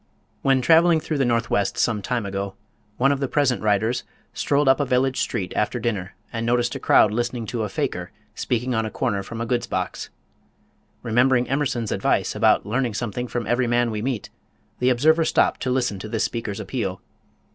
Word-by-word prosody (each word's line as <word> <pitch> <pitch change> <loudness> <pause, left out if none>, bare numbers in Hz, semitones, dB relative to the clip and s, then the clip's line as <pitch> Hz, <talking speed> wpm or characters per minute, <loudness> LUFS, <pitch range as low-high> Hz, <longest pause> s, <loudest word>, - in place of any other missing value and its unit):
When 135 -1 +3
traveling 165 +3 +5
through 155 -1 -3
the 135 - +3
Northwest 115 -4 0
some 110 -3 +1
time 120 +1 -2
ago, 100 0 -4 0.4
one 135 +2 +3
of 140 - 0
the 135 - -1
present 135 -3 +1
writers 110 +3 +1 0.3
strolled 145 0 +1
up 135 - +5
a - - +2
village 130 +1 +1
street 95 - -2
after 105 +3 0
dinner 105 -5 -3 0.2
and 115 -1 -2
noticed 120 0 +1
a - - -5
crowd 105 - +5
listening 120 +1 -2
to 115 +1 -3
a 105 - -2
"faker" - - -3 0.2
speaking 125 +1 -1
on 110 -1 +1
a 110 - -3
corner 100 -1 -1
from 115 +4 -7
a - - -1
goods 120 +1 -1
box. - - -3 0.9
Remembering 125 +2 +3
Emerson's 130 -5 -1
advice - - +1
about - - +3
learning 120 +1 -1
something 120 +2 -3
from 120 -1 -3
every 120 +1 +1
man 120 0 +2
we 105 -1 -3
meet, 125 -3 -3 0.5
the 125 - +3
observer 155 +7 +4
stopped - - +2
to 130 - -1
listen 125 -6 0
to 110 - -7
this 110 0 -1
speaker's 110 -4 -3
appeal. 100 -3 -3
120 Hz, 190 wpm, -23 LUFS, 110-130 Hz, 0.9 s, traveling